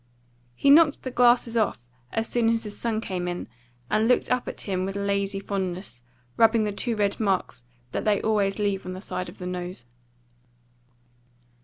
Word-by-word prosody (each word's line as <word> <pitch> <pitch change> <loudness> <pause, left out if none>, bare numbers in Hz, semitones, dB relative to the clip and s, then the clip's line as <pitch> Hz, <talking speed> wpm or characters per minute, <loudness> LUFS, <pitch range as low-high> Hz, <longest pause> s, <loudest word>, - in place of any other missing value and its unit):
He 280 - +4
knocked 300 0 +6
the 255 - -4
glasses 240 -1 +4
off 220 - +1 0.3
as 225 0 -2
his 230 -3 +1
son 225 -2 -2
came 180 -4 -3
in 175 0 -4 0.4
and 215 - +2
looked 250 - +2
up 250 -1 +1
at - - -6
him 185 -2 -2
with 195 +1 -3
lazy 200 0 -1
fondness, 185 - -4 0.4
rubbing 225 0 +5
the 210 - -1
two 230 +3 -2
red 205 -2 0
marks 190 - -1 0.3
that - - -2
they 210 -2 +2
always 205 -3 +1
leave 200 -2 -1
on 185 - -4
the 185 - -7
side 180 -3 -4
of 180 - -13
the 180 - -7
nose. 180 -6 -5
205 Hz, 170 wpm, -25 LUFS, 185-225 Hz, 0.4 s, knocked